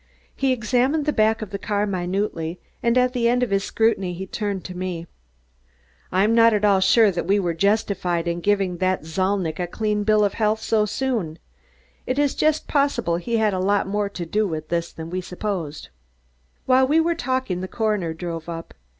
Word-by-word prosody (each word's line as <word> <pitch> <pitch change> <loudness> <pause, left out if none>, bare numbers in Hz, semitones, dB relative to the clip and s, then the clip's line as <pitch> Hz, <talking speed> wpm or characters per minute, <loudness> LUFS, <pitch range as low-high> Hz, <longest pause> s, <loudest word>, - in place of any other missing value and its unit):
He 270 -1 +1
examined 255 +5 +1
the 300 - +1
back 220 0 +2
of 200 - -9
the 200 - -4
car 205 0 0
minutely, 180 -3 -2 0.2
and 235 +1 +2
at 250 0 +3
the 235 -2 +2
end 250 +1 +2
of 240 - -2
his 195 0 +1
scrutiny 195 -6 0
he 190 +2 -5
turned 200 -1 -4
to 180 - -7
me. 180 -2 -4 1.1
"I'm 195 +5 +3
not 230 -1 +5
at 210 0 +1
all 200 -2 +4
sure 205 +3 +5
that 175 -1 -3
we 200 +2 +3
were 175 -3 0
justified 180 -2 0
in 170 0 -1
giving 195 -3 +1
Zalnitch 185 -1 -1
a 175 - -1
clean 210 +2 -1
bill 215 0 +3
of 200 - -1
health 215 -1 +1
so 220 -1 +1
soon. 215 -10 -2 0.7
It 255 - -1
is 290 -1 +2
just 310 0 +1
possible 280 - +1
he 230 +6 -1
had 215 -2 +2
a 185 - -1
lot 200 +2 +2
more 205 +1 -1
to 180 -3 -6
do 210 +5 0
with 155 -3 -5
this 170 0 -1
than 165 +1 -8
we 185 +1 -2
supposed." 180 -5 -5 0.8
While 260 0 +4
we 305 +4 +4
were 335 +1 +2
talking 260 - -2
the 185 - -4
coroner 210 -6 -1
drove 165 0 -5
up. 165 0 -7
200 Hz, 195 wpm, -23 LUFS, 180-230 Hz, 1.1 s, not